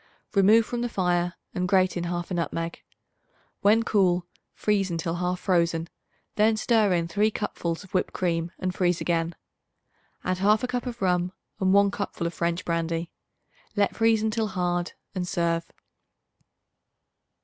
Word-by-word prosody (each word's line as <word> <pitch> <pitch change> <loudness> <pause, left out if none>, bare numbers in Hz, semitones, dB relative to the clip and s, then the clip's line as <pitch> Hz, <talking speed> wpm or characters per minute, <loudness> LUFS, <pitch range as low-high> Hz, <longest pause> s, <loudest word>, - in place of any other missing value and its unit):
Remove 215 +3 +5
from 240 +1 -3
the 240 - -1
fire 175 -3 0 0.2
and 180 0 -1
grate 185 0 +3
in 175 -1 -2
1/2 175 +1 -3
nutmeg. 165 -1 -2 0.8
When 215 +3 +5
cool, 180 -5 +2 0.3
freeze 200 -2 +1
until 165 -1 -2
half 180 +1 -1
frozen; 170 -2 +1 0.5
then 215 +1 +4
stir 220 -3 +3
in 170 -1 0
3 205 +6 +2
cupfuls 175 -5 -3
of 190 - -17
whipped 185 - +1
cream 170 -2 -1
and 185 -1 -2
freeze 180 -2 +1
again. 165 -1 0 0.9
Add 185 0 0
1/2 210 +5 +3
cup 250 0 -3
of 235 -4 -5
rum 180 0 +1 0.3
and 185 -1 +2
1 200 0 +5
cupful 200 -4 -4
of 170 - -2
French 170 +2 -1
brandy. 165 0 -1 0.6
Let 205 -2 +2
freeze 225 -1 +3
until 220 0 0
hard 175 -2 -1 0.2
and 180 -2 -3
serve. 170 -1 -1
180 Hz, 150 wpm, -26 LUFS, 170-205 Hz, 0.9 s, Remove